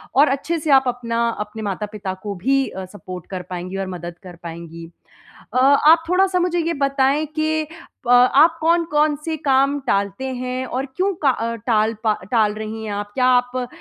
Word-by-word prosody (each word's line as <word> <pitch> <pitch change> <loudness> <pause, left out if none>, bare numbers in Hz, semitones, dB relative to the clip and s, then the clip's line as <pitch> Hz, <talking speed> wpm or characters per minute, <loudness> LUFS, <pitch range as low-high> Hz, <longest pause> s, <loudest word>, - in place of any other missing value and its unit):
और 285 +3 +6
अच्छे 330 +4 -3
से 305 - -4
आप 265 -1 +6
अपना 235 -1 -1
अपने 210 +1 -6
माता-पिता 205 0 -4
को 205 -1 -4
भी 270 +9 +1
अ, 190 0 -7
सपोर्ट 185 -2 -9
कर 185 -1 -4
पाएँगी 180 +1 -5
और 195 -1 -3
मदद 175 0 -8
कर 180 -2 -10
पाएँगी। 165 0 -8 0.6
अ, - - 0
आप 290 +5 +5
थोड़ा-सा 370 0 +3
मुझे 350 0 0
ये 335 0 0
बताएँ 275 +2 +1
कि 310 0 0
प 285 - -12
आप 255 +6 +6
कौन-कौन 315 -2 +2
से 325 -1 -1
काम 275 0 +2
टालते 200 +3 0
हैं 255 +1 -3
और 260 +2 -3
क्यों 390 +2 +1
का 280 - +5
अ, 230 -2 -1
टाल 220 0 +1
पा 215 -2 +3 0.2
टाल 215 -4 +3
रही 220 +1 -6
हैं 210 - -4
आप? 205 0 -5
क्या 250 +2 +1
आप 245 0 -4
245 Hz, 185 wpm, -21 LUFS, 205-295 Hz, 0.6 s, और